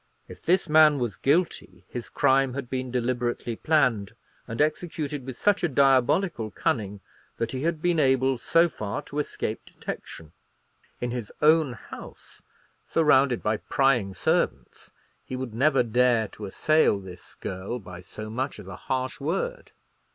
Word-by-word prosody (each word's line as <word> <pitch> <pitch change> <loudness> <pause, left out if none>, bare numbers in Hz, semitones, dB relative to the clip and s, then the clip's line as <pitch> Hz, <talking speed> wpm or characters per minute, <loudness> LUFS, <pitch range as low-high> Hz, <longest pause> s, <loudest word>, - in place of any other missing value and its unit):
If - - -12
this 180 +1 +2
man 155 -1 +6
was 120 -6 -2
guilty, 165 +6 0
his 120 -2 -7
crime 135 -1 +2
had 140 -3 -5
been 130 -1 -2
deliberately 120 -1 -1
planned, 120 -9 +1 0.3
and 115 -1 -6
executed 150 -3 -1
with 130 -2 -6
such 205 -2 +2
a - - +4
diabolical 135 - +3
cunning, 105 - -2 0.4
that 115 -1 -2
he 130 - -3
had 160 0 -1
been 175 -2 +2
able 130 -2 +3
so 165 +8 +4
far 105 -10 -5
to 145 - -5
escape 110 -6 -3
detection. 80 -2 -8 0.7
In 120 0 -2
his 120 -4 -5
own 155 -3 +4
house, 120 - -12 0.5
surrounded 140 -6 +3
by 105 0 +1
prying 120 -9 +1
servants, - - -1 0.3
he 130 - -6
would 130 -3 -5
never 135 +2 +3
dare 120 -1 +2
to 105 - -8
assail 155 +1 +3
this 95 -2 -12
girl 95 +6 -5
by 90 -5 -10
so 110 +4 -8
much 130 +5 -3
as 105 - -10
a 95 0 -8
harsh 130 0 -3
word. 195 - -3
130 Hz, 150 wpm, -26 LUFS, 115-150 Hz, 0.7 s, man